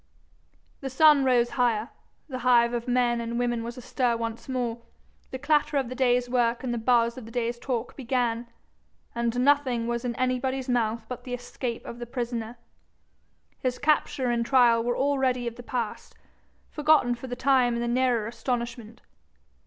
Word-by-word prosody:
The 270 - -5
sun 295 +1 +5
rose 240 -2 +3
higher; 235 -2 +1 0.4
the 260 -4 -5
hive 240 -1 +4
of 240 +1 -3
men 245 -1 +2
and 235 0 -3
women 240 -1 0
was 235 +1 -6
astir 250 -1 0
once 230 +2 -5
more; 240 -3 -2 0.5
the 260 - -5
clatter 295 +1 +1
of 265 -4 0
the - - -4
day's 250 -1 +2
work 245 -1 +1
and 245 -2 -2
the 240 - -2
buzz 235 +1 +2
of 240 - -11
the 225 - -11
day's 235 0 -2
talk 245 -3 -3
began, 240 -2 -1 0.7
and 235 +1 -1
nothing 260 -4 +2
was 235 +1 -2
in 240 -2 -2
anybody's 255 +1 -1
mouth 230 -2 0
but 250 - -7
the 250 -1 -4
escape 245 -1 -5
of 235 - -8
the 240 - -6
prisoner. 235 -2 -4 1.0
His 255 -1 -1
capture 280 -4 +1
and 235 -1 +1
trial 235 -2 +4
were 240 0 -1
already 265 -3 +1
of 235 -1 -4
the 245 - -9
past, 240 -3 -4 0.6
forgotten 300 -5 +3
for 240 +2 -7
the 245 - -4
time 250 -2 +3
in - - -2
the 240 - -1
nearer 245 -2 +1
astonishment. 235 -1 -4
245 Hz, 175 wpm, -26 LUFS, 235-255 Hz, 1.0 s, sun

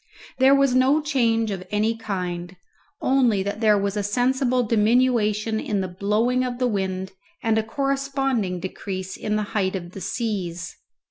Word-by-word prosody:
There 265 +1 +6
was 275 -2 +3
no 260 +4 +4
change 230 -7 +1
of 190 -2 -4
any 215 +3 +1
kind, 180 -4 -4 0.5
only 245 -7 +3
that 200 +2 -4
there 215 -2 +5
was 200 0 -1
a 205 - 0
sensible 250 +4 +1
diminution 220 -1 +2
in 205 -3 -1
the 185 - -2
blowing 210 +7 +1
of 250 -1 -3
the 250 - 0
wind 190 -4 -2 0.3
and 225 -2 +2
a - - -1
corresponding 270 -6 -1
decrease 190 0 -5
in 210 - -2
the 215 - 0
height 195 -2 0
of 175 -2 -6
the 195 - -9
seas. 180 -8 -3
215 Hz, 160 wpm, -23 LUFS, 195-250 Hz, 0.5 s, There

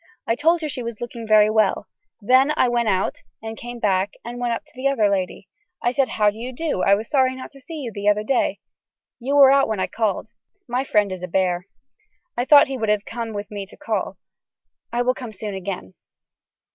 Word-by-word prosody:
I 230 - +1
told 325 +7 +2
her 310 - -2
she 265 -3 -4
was 235 -2 -6
looking 235 -1 -6
very 215 0 +5
well. 215 -1 +2
I 410 - -27
then 260 +5 +5 0.2
went 235 -2 +1
out 190 -1 0 0.2
and 220 0 -6
came 240 +1 -8
back 195 -3 +1
and 240 +1 -6
went 245 -1 -1
up 230 - -3
to 300 - -25
the 265 0 -1
other 265 -7 +3
lady. 190 -1 -2 0.4
I 240 - +2
said 265 0 +1
how 210 -1 +2
do 210 - -14
you 245 +2 -5
do 290 - -2
I 200 - +5
was 215 +3 -5
sorry 260 -3 +2
not 260 - -9
to 275 - -16
see 325 +5 -9
you 240 -4 -5
the 205 +1 +1
other 210 0 +2
day. 255 +4 0 0.6
You 270 +4 -1
were 275 -2 +8
out 275 0 +4
when 220 -3 -2
I - - +1
called. 220 -3 -2 0.4
My 250 +2 0
friend 210 -6 +2
is 185 -1 -5
a 180 - -4
bear. 180 0 0 0.7
I 245 - -1
thought 285 +1 +8
he 265 -1 -5
would 220 -1 -1
have 210 -1 +1
come 230 -1 -5
with 205 0 -6
me 200 -2 -5
to - - -16
call. - - -3 0.7
I 240 +1 0
will 255 +1 +2
come 245 -3 -8
soon 210 0 -6
again. 185 - -5
230 Hz, 230 wpm, -22 LUFS, 205-260 Hz, 0.7 s, were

